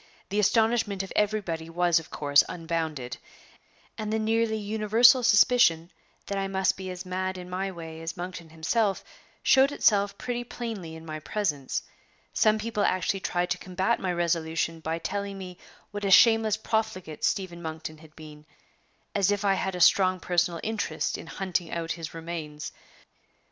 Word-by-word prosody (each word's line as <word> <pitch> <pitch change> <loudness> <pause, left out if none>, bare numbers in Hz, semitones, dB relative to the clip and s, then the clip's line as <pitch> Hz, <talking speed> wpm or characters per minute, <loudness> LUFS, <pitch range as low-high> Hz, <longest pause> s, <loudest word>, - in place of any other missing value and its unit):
The 205 +2 0
astonishment 220 -2 +2
of 190 - -8
everybody 195 -6 -1
was 175 0 +2
of 160 - -12
course 145 -1 +4
unbounded, 160 -7 -3 0.8
and 215 -1 -3
the 220 - +1
nearly 220 0 +1
universal 220 +4 +4
suspicion 210 -7 +4 0.3
that 200 0 -2
I 195 - -1
must 190 -1 +1
be 190 -1 -7
as 180 +1 -6
mad 185 +1 -3
in 180 -1 -8
my 190 +2 -2
way 165 -2 -8
as 165 +2 -5
Monkton 175 -2 -6
himself 195 +6 0 0.4
showed 270 +1 +5
itself 200 -7 +2
pretty 245 -1 -3
plainly 220 -9 -6
in 160 0 -11
my 155 -1 -5
presence. 155 -8 -2 0.5
Some 215 0 +3
people 215 -1 -3
actually 185 +1 +1
tried 180 -1 -1
to - - 0
combat 190 +5 0
my 185 - -1
resolution 165 -1 -1
by 160 +1 -2
telling 200 +3 -4
me 180 -2 -9 0.3
what 205 0 -5
a 200 - +1
shameless 220 +1 +6
profligate 215 -8 -3
Stephen 185 -4 -1
Monkton 160 -1 -6
had 155 -1 -17
been 155 -1 -12 0.7
as 200 -2 +2
if 205 0 0
I 195 - +4
had 190 -1 -2
a - - -4
strong 185 +1 +5
personal 175 -1 0
interest 215 -7 -2
in - - -8
hunting 180 -2 -2
out 165 -1 -3
his 165 -2 -5
remains! 160 -3 -6
185 Hz, 165 wpm, -27 LUFS, 165-210 Hz, 0.8 s, shameless